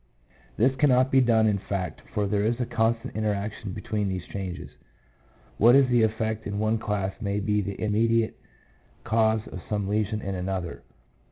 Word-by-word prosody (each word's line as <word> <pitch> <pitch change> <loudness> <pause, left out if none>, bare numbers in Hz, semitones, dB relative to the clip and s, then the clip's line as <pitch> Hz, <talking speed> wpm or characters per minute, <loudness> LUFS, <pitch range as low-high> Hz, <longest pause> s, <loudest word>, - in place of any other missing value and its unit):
This 130 +4 +3
cannot 130 -1 +4
be 130 - +5
done 115 -3 +4
in 105 -2 +2
fact, 95 -2 -4
for 105 -2 +1
there 100 0 0
is 115 +3 0
a 125 - 0
constant 115 -1 -1
interaction 105 -1 -2
between 105 +1 -2
these 90 -2 -4
changes. 95 -3 -6 0.9
What 120 +4 +7
is 135 -1 +6
the 120 -1 +4
effect 110 0 -1
in 100 0 -3
one 110 +1 +1
class 100 -4 -2
may 100 -1 -1
be 105 0 +1
the 100 0 -5
immediate 110 +1 +1 0.7
cause 110 -1 +2
of 95 - -7
some 105 -2 -1
lesion 105 +1 0
in 100 -2 -4
another. 90 -1 -4
110 Hz, 170 wpm, -26 LUFS, 100-115 Hz, 0.9 s, What